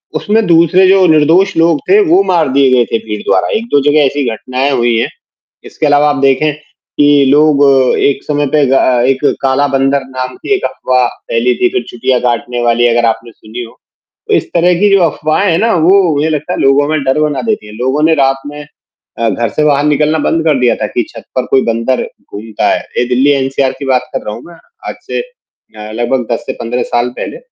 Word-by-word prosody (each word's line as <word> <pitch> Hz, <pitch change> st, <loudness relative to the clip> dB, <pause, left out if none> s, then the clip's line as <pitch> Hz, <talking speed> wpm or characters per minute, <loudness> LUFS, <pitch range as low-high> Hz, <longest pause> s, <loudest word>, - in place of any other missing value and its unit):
उसमें 220 Hz, +1 st, 0 dB
दूसरे 170 Hz, +2 st, +4 dB
जो 190 Hz, -1 st, +4 dB
निर्दोष 165 Hz, +5 st, +3 dB
लोग 165 Hz, -2 st, +2 dB
थे, 405 Hz, +2 st, +5 dB
वो 365 Hz, +3 st, +3 dB
मार 165 Hz, -, 0 dB
दिए 140 Hz, -1 st, +3 dB
गए 120 Hz, -2 st, +3 dB
थे -, -, +1 dB
भीड़ 105 Hz, -1 st, -5 dB
द्वारा, 95 Hz, -, +1 dB
1-2 225 Hz, -11 st, 0 dB
जगह 150 Hz, -1 st, +3 dB
ऐसी 140 Hz, +1 st, -1 dB
घटनाएँ 130 Hz, +5 st, -2 dB
हुई 120 Hz, -3 st, +1 dB
हैं, 115 Hz, -, -1 dB, 0.6 s
इसके 155 Hz, -, -4 dB
अलावा 145 Hz, 0 st, +3 dB
आप 145 Hz, -, -1 dB
देखें, 140 Hz, +3 st, +2 dB, 0.5 s
कि 145 Hz, -1 st, +4 dB
लोग 145 Hz, 0 st, +3 dB, 0.4 s
एक 140 Hz, -1 st, 0 dB
समय 145 Hz, -1 st, -1 dB
पे 150 Hz, -, +3 dB
ग 130 Hz, -, -1 dB
अ, 130 Hz, -2 st, +2 dB
एक 135 Hz, -1 st, 0 dB, 0.2 s
काला 135 Hz, +2 st, +1 dB
बंदर 135 Hz, +1 st, +1 dB
नाम 130 Hz, -1 st, -6 dB
की -, -, -4 dB
एक 390 Hz, -, -3 dB
अफवाह 125 Hz, -1 st, 0 dB, 0.2 s
फैली 120 Hz, +2 st, +1 dB
थी, 365 Hz, -, +1 dB
फिर 380 Hz, -, -1 dB
चुटियाँ 125 Hz, +1 st, -1 dB
काटने 120 Hz, 0 st, -2 dB
वाली 120 Hz, 0 st, +2 dB
अगर 120 Hz, 0 st, +1 dB
आपने 115 Hz, +1 st, -4 dB
सुनी 110 Hz, +3 st, -9 dB
हो। 115 Hz, -, -13 dB, 0.6 s
तो -, -, 0 dB
इस -, -, +1 dB
तरह 175 Hz, +1 st, +3 dB
की 205 Hz, -, +3 dB
जो 195 Hz, -1 st, +4 dB
अफवाहें 160 Hz, +4 st, 0 dB
हैं 165 Hz, -, +1 dB
ना, 230 Hz, +1 st, +1 dB
वो 180 Hz, +1 st, +3 dB
मुझे 150 Hz, +3 st, 0 dB
लगता 155 Hz, +3 st, -3 dB
है -, -, -4 dB
लोगों 140 Hz, +1 st, +2 dB
में 155 Hz, -2 st, -1 dB
डर 135 Hz, +2 st, 0 dB
बना 145 Hz, -3 st, -1 dB
देती 105 Hz, -, -2 dB
हैं, 105 Hz, -, -12 dB
लोगों 130 Hz, +4 st, -1 dB
ने 160 Hz, +1 st, +4 dB
रात 135 Hz, -1 st, +1 dB
में 145 Hz, 0 st, -8 dB, 0.6 s
अ, 115 Hz, -1 st, +1 dB
घर 115 Hz, -1 st, -2 dB
से 150 Hz, -, -2 dB
बाहर 145 Hz, -1 st, +2 dB
निकलना 150 Hz, +1 st, +1 dB
बंद 160 Hz, +2 st, 0 dB
कर 145 Hz, -5 st, +2 dB
दिया 125 Hz, -1 st, +2 dB
था 105 Hz, -, -3 dB
कि 120 Hz, -, -2 dB
छत 115 Hz, -, -12 dB
पर 130 Hz, -, -1 dB
कोई 135 Hz, -, +4 dB
बंदर 115 Hz, +2 st, -1 dB, 0.3 s
घूमता 110 Hz, +1 st, -3 dB
है, -, -, -1 dB, 0.2 s
ये 125 Hz, -, +1 dB
दिल्ली 130 Hz, +3 st, +2 dB
एनसीआर 135 Hz, -1 st, 0 dB
की 140 Hz, -, -6 dB
बात 130 Hz, -1 st, 0 dB
कर -, -, -3 dB
रहा 105 Hz, -, -4 dB
हूँ 120 Hz, -, -11 dB
मैं, 175 Hz, -, -14 dB, 0.3 s
आज -, -, -7 dB
से -, -, -3 dB
अ, 110 Hz, -, -15 dB
लगभग 120 Hz, +2 st, -1 dB
10 115 Hz, -, -2 dB
से -, -, -3 dB
15 120 Hz, +2 st, -2 dB
साल 120 Hz, +1 st, +1 dB
पहले। -, -, -6 dB
140 Hz, 225 wpm, -12 LUFS, 125-155 Hz, 0.6 s, थे